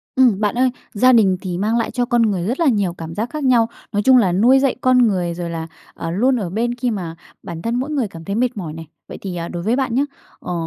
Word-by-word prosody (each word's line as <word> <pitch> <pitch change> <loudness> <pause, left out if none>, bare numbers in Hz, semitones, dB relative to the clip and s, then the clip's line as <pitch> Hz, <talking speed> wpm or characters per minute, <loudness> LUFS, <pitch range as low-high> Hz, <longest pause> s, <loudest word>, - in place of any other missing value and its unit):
Ừm, 245 -7 +4
bạn 210 0 0
ơi, 255 +1 +3 0.2
gia 255 +4 +4
đình 195 -6 +4
thì 180 -2 -4
mang 215 +5 0
lại 230 - -1
cho 245 -1 0
con 240 -1 +2
người 200 -6 +1
rất 250 +7 -2
là 335 - +3
nhiều 200 -8 +1
cảm 165 -1 -8
giác 225 +4 -2
khác 305 +2 -5
nhau, 240 -4 +3 0.2
nói 205 -1 0
chung 260 +2 +6
là 200 -7 +3
nuôi 235 +9 +4
dạy 270 -1 +1
con 250 -2 +4
người, 180 -4 -1
rồi 170 0 -5
là, 165 -1 -5 0.3
ờ, 165 - -5
luôn 250 +9 +2
ở 190 -5 -3
bên 235 +6 -1
khi 245 0 -1
mà 175 -6 -5 0.3
bản 165 -1 -7
thân 230 +4 -2
mỗi 260 +4 -2
người 280 -7 -1
cảm 165 -4 -11
thấy 200 - -3
mệt 240 0 0
mỏi 165 -6 -5
này. 160 0 -9 0.2
Vậy - - -7
thì, 190 -3 -5
à, 170 -1 -4
đối 170 -1 -5
với 225 +5 +1
bạn 260 -3 -1
nhá, 270 - +3 0.4
ờ, 180 - -5
220 Hz, 280 wpm, -19 LUFS, 180-250 Hz, 0.4 s, chung